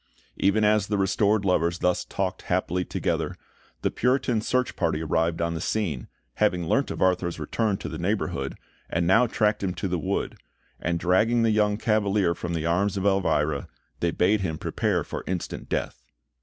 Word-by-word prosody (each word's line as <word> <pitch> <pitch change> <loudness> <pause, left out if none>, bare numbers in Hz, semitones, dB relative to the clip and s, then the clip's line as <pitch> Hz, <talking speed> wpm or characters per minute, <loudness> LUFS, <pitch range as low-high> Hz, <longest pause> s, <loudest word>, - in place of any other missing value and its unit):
Even 100 +2 +2
as 105 -1 +3
the 105 - 0
restored 100 +2 +2
lovers 85 -2 +2
thus 90 0 +1
talked 95 -1 -3
happily 90 0 0
together, - - -2 0.5
the - - +1
Puritan 125 -2 +1
search 125 +3 0
party 80 -2 0
arrived 80 +2 0
on 85 0 -1
the 80 - -4
scene, 85 - -2 0.3
having 90 -5 +2
learnt 135 +10 +2
of - - -1
Arthur's 90 -2 +1
return 100 +6 0
to - - -6
the - - -6
neighbourhood, - - -1 0.3
and 85 +1 0
now 115 +8 +5
tracked 105 -2 +1
him 95 -2 -2
to 100 - -2
the 90 -1 -1
wood; 75 - -2 0.4
and 85 0 -1
dragging 110 +7 +3
the 115 - +3
young 105 -1 +2
Cavalier 105 -5 +2
from 85 0 -4
the 80 -1 -2
arms 95 +4 +1
of 95 - -2
Elvira, 80 -7 +1 0.3
they 85 - +1
bade 95 +5 +2
him 80 -4 -2
prepare - - 0
for - - -6
instant 90 -2 -4
death. - - -3
95 Hz, 180 wpm, -26 LUFS, 85-105 Hz, 0.5 s, now